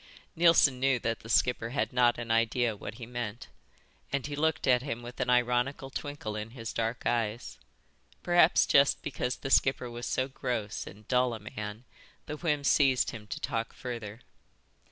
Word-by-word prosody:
Neilson 165 Hz, -6 st, +5 dB
knew 135 Hz, 0 st, +3 dB
that 115 Hz, -1 st, -2 dB
the 115 Hz, -, -12 dB
skipper 115 Hz, 0 st, +2 dB
had 135 Hz, +1 st, -2 dB
not 120 Hz, -1 st, +4 dB
an 120 Hz, -1 st, -4 dB
idea 115 Hz, 0 st, +2 dB
what 105 Hz, +1 st, -8 dB
he 120 Hz, 0 st, -8 dB
meant, 120 Hz, -2 st, -6 dB, 0.6 s
and 140 Hz, -2 st, -1 dB
he 145 Hz, 0 st, -4 dB
looked 155 Hz, 0 st, 0 dB
at 125 Hz, -1 st, +4 dB
him 120 Hz, -3 st, -5 dB
with 120 Hz, +1 st, -9 dB
an -, -, -1 dB
ironical 125 Hz, +2 st, +1 dB
twinkle 145 Hz, -7 st, -5 dB
in 105 Hz, +1 st, -5 dB
his 115 Hz, -1 st, -5 dB
dark 115 Hz, +1 st, -2 dB
eyes. 115 Hz, -1 st, -1 dB, 0.6 s
Perhaps 175 Hz, -1 st, +5 dB
just 140 Hz, 0 st, +4 dB
because 130 Hz, -3 st, -2 dB
the 135 Hz, -, -6 dB
skipper 130 Hz, -3 st, +3 dB
was 120 Hz, +1 st, -5 dB
so 130 Hz, -, 0 dB
gross 120 Hz, -5 st, -4 dB
and 105 Hz, +2 st, -12 dB
dull 125 Hz, -2 st, +2 dB
a -, -, -8 dB
man 105 Hz, +2 st, -7 dB, 0.4 s
the 150 Hz, -, -5 dB
whim 150 Hz, -3 st, 0 dB
seized 135 Hz, -3 st, +3 dB
him 110 Hz, -2 st, -9 dB
to -, -, -5 dB
talk 115 Hz, 0 st, -3 dB
further. 115 Hz, -3 st, -7 dB
125 Hz, 175 wpm, -29 LUFS, 115-135 Hz, 0.6 s, Neilson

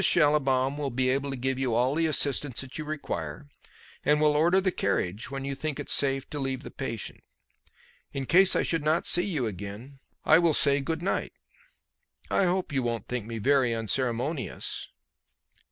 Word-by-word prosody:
Schallibaum 145 Hz, -4 st, +3 dB
will 145 Hz, -2 st, -1 dB
be 130 Hz, +1 st, 0 dB
able 140 Hz, +1 st, -1 dB
to 135 Hz, -, -4 dB
give 130 Hz, +1 st, -1 dB
you 125 Hz, -4 st, 0 dB
all 125 Hz, +3 st, +2 dB
the 165 Hz, +1 st, +1 dB
assistance 140 Hz, -3 st, +1 dB
that 135 Hz, +3 st, -8 dB
you -, -, -3 dB
require, 80 Hz, -, -5 dB, 0.6 s
and 150 Hz, 0 st, +3 dB
will 150 Hz, -1 st, +3 dB
order 170 Hz, +5 st, +4 dB
the 190 Hz, -1 st, +1 dB
carriage 100 Hz, -, -2 dB
when 135 Hz, 0 st, -5 dB
you 140 Hz, -, -2 dB
think 150 Hz, +1 st, -4 dB
it -, -, -5 dB
safe 135 Hz, -1 st, +2 dB
to 150 Hz, -, -4 dB
leave 135 Hz, -1 st, -3 dB
the -, -, -9 dB
patient. -, -, -6 dB, 0.9 s
In 135 Hz, -1 st, -4 dB
case 185 Hz, +6 st, +5 dB
I -, -, +2 dB
should 165 Hz, -3 st, -1 dB
not 155 Hz, +3 st, +1 dB
see 175 Hz, +2 st, +4 dB
you 150 Hz, -10 st, -1 dB
again 105 Hz, +7 st, -7 dB, 0.3 s
I 160 Hz, -, +6 dB
will 170 Hz, -3 st, +3 dB
say 140 Hz, -1 st, +3 dB
'good 160 Hz, +4 st, -3 dB
night.' 195 Hz, -, -1 dB, 1.0 s
I 195 Hz, -, +3 dB
hope 180 Hz, -3 st, -1 dB
you 135 Hz, -, +1 dB
won't 115 Hz, -3 st, -3 dB
think 120 Hz, -3 st, -4 dB
me 115 Hz, -1 st, -5 dB
very 130 Hz, 0 st, +2 dB
unceremonious." 125 Hz, +5 st, -2 dB
135 Hz, 185 wpm, -27 LUFS, 125-155 Hz, 1.0 s, I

